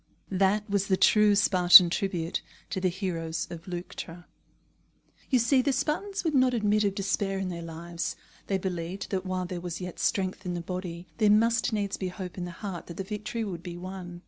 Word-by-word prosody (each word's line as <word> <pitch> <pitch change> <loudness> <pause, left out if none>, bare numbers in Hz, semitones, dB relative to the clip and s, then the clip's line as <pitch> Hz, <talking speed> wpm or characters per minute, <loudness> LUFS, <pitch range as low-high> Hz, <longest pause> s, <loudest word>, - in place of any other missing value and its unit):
That 195 +2 +2
was 200 -1 0
the 190 - +2
true 210 0 +5
Spartan 180 -3 +8
tribute 175 -4 -1 0.3
to 190 - -2
the 185 - +2
heroes 170 -3 -3
of 170 0 -9
Leuctra. 175 -1 -7 1.0
You 260 - +4
see, 250 +3 +3
the 280 +2 +1
Spartans 330 +9 -1
would 320 -3 0
not 255 -2 +4
admit 215 -1 +2
of 200 -1 0
despair 195 0 -1
in 190 -1 -2
their 170 -1 -5
lives; 170 +1 -5 0.3
they 195 - +1
believed 180 0 -4
that 190 -1 -2
while 185 0 -2
there 175 -1 -5
was 175 -1 -5
yet 180 -1 -7
strength 190 -1 0
in 180 -2 -3
the 175 - -3
body, 180 -1 -5
there 215 - +4
must 230 +3 +3
needs 205 -2 -1
be 190 - -3
hope 180 -1 -7
in 180 - -4
the - - -6
heart 180 0 -7
that 170 - -9
the 195 - -2
victory 210 +3 -4
would 180 -6 -5
be 175 0 -7
won. 180 -1 -7
190 Hz, 200 wpm, -28 LUFS, 175-205 Hz, 1.0 s, Spartan